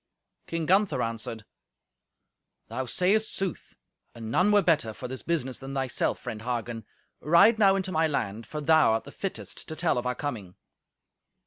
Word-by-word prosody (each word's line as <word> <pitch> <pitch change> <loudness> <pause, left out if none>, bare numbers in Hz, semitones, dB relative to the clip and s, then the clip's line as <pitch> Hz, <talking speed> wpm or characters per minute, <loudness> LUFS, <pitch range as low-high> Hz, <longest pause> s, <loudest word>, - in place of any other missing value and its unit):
King 165 -1 -2
Gunther 195 +4 +3
answered, 115 -1 -5 1.2
"Thou 130 -1 -3
sayest 200 - +1
sooth. 190 -3 -4 0.4
And 115 -1 -7
none 185 - +3
were 205 -1 +5
better 155 -10 +2
for 125 - -7
this 130 0 -6
business 135 -7 -2
than 135 +1 -7
thyself, 130 -2 0
friend 110 - -7
Hagen. 120 -2 -4 0.3
Ride 185 +8 +5
now 195 -2 +6
into 190 -1 -2
my 160 -1 +2
land, 110 -6 -3
for 150 - -5
thou 155 -5 +5
art 115 - -1
the 140 - -11
fittest 195 +4 -5
to 160 - -5
tell 160 -6 +1
of 120 - -4
our 125 - -1
coming." 110 -11 -5
145 Hz, 170 wpm, -27 LUFS, 115-180 Hz, 1.2 s, now